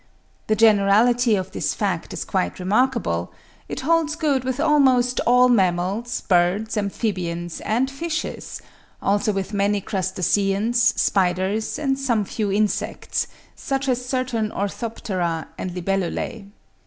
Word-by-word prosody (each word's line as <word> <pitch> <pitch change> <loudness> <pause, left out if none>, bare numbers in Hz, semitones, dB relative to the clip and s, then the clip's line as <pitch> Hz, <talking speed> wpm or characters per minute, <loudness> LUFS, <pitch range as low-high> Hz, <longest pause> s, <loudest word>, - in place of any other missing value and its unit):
The 215 - +2
generality 220 +2 +4
of 185 -2 -3
this - - -2
fact - - -2
is - - -4
quite 90 - -1
remarkable: 200 - 0 0.4
it - - -4
holds 320 +2 +1
good 295 -6 0
with 260 +1 -2
almost 260 -5 +3
all 250 +1 +6
mammals, 200 +2 +1
birds, 185 +5 +1
amphibians, 180 -5 -3
and 250 +5 0
fishes; 330 +4 -4 0.4
also 205 +3 +1
with 195 +1 -3
many 200 0 +1
crustaceans, 195 +4 0 0.2
spiders, 190 +3 +1
and 270 -2 -1
some 235 -6 +1
few 205 0 -2
insects, 210 +1 -1 0.3
such 275 -1 -2
as 250 -1 0
certain 250 -4 -1
orthoptera 190 -5 -3
and 185 -1 -5
libellulae. 195 +3 -2
215 Hz, 120 wpm, -22 LUFS, 190-250 Hz, 0.4 s, all